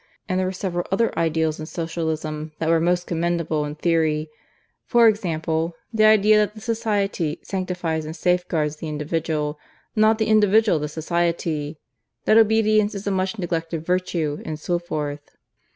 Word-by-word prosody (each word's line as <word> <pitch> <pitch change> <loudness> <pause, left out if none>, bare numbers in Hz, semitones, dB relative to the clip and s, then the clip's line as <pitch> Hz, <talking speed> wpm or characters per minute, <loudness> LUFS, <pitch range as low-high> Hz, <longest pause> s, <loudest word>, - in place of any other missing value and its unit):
And 185 -2 0
there 185 - 0
were - - -1
several 180 -2 -3
other 230 +4 +1
ideals 160 -1 0
in 155 - -6
Socialism 160 -2 -3
that 160 - -1
were 165 0 +4
most 175 +2 +1
commendable 170 -2 -1
in 150 0 -5
theory: 155 -2 0 0.6
for 235 -1 +6
example, 165 -5 0 0.2
the 215 -1 +4
idea 215 0 +6
that 210 0 +1
the - - -9
Society 205 -8 -1
sanctifies 180 -4 -2
and 155 +1 -6
safeguards 175 -4 0
the 160 - -6
individual, 150 0 -2 0.4
not 215 0 +4
the 220 - +1
individual 215 -4 +4
the 150 - -2
Society; 160 -1 -1 0.5
that 215 - +4
obedience 215 -1 +3
is 200 - -6
a 200 - 0
much 190 +3 -1
neglected 165 -3 -3
virtue, 170 -4 -1
and 155 -1 -5
so 175 +2 -1
forth. 150 -4 -5
170 Hz, 155 wpm, -23 LUFS, 155-200 Hz, 0.6 s, for